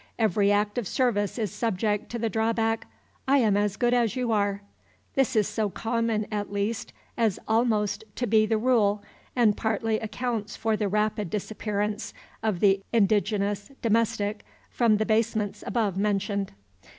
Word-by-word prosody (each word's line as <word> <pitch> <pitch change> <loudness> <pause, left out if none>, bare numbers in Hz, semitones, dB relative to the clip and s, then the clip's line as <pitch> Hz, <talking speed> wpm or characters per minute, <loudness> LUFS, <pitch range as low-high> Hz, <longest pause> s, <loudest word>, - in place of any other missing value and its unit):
Every 205 -2 +3
act 205 +3 +1
of 225 - -4
service 220 -5 0
is 215 -6 -1
subject 210 -2 -1
to 235 - -4
the 230 0 -1
drawback, 225 +1 0 0.4
"I 275 +1 +5
am 220 -6 +3
as 205 0 0
good 240 -1 +2
as 240 -2 +2
you 250 -2 -1
are." 200 -1 0 0.5
This 265 -2 +1
is 215 -2 +3
so 215 -2 -1
common, 225 0 -1
at 205 -1 -3
least, 205 +3 -2 0.3
as 225 -5 +2
almost 220 -3 +1
to 245 - -1
be 215 -1 +3
the 220 0 +2
rule, 215 -4 +2 0.3
and 225 -5 +4
partly 220 0 0
accounts 220 -1 -3
for 225 -1 0
the 210 -1 -1
rapid 210 -1 0
disappearance 210 0 -3 0.3
of 210 -6 -1
the 195 -1 +4
indigenous 205 -1 +1
"domestic" 220 -2 +1 0.3
from 230 -3 +3
the 215 - 0
basements 220 -2 0
above 210 -6 0
mentioned. 200 -1 -1
215 Hz, 155 wpm, -26 LUFS, 205-230 Hz, 0.5 s, I